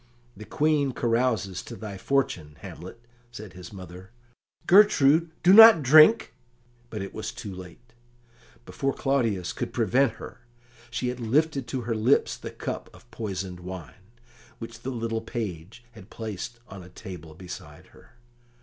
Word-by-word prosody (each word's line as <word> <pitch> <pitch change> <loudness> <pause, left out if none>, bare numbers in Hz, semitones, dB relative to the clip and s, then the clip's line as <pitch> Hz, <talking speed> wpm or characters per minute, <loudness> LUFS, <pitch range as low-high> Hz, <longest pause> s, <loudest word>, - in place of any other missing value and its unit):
"The 105 +2 -10
Queen 150 -2 +1
carouses 115 -6 0
to 120 - -9
thy 110 -3 -8
fortune, 95 - -1
Hamlet," 95 +2 -10 0.3
said 110 -5 -10
his 90 -1 -11
mother. 95 -1 -11 0.6
"Gertrude, 170 -5 +5
do 185 - +6
not 225 -6 +10
drink," 155 - +7
said - - -9
the - - -16 0.5
King, 120 - -33
but 110 -3 -5
it 100 - -8
was 110 -1 -5
too 100 - -8
late; 95 +6 -13 0.7
before 135 0 -3
Claudius 115 -10 -1
could - - -5
prevent 120 +2 +2
her, - - -11 0.5
she 120 +1 -2
had 125 0 -5
lifted 135 +3 0
to 130 - -3
her 115 0 -2
lips 115 +5 +2
the - - -8
cup - - -6
of - - -20
poisoned 95 -4 -5
wine, 90 - -10 0.5
which 115 -1 -9
the 125 - -6
little 115 -3 -3
page 110 -1 -6
had 110 -3 -15
placed 110 +1 -7
on 100 -3 -10
a 90 - -13
table 85 -4 -10
beside 90 -1 -11
her. - - -20
115 Hz, 160 wpm, -26 LUFS, 95-130 Hz, 0.7 s, not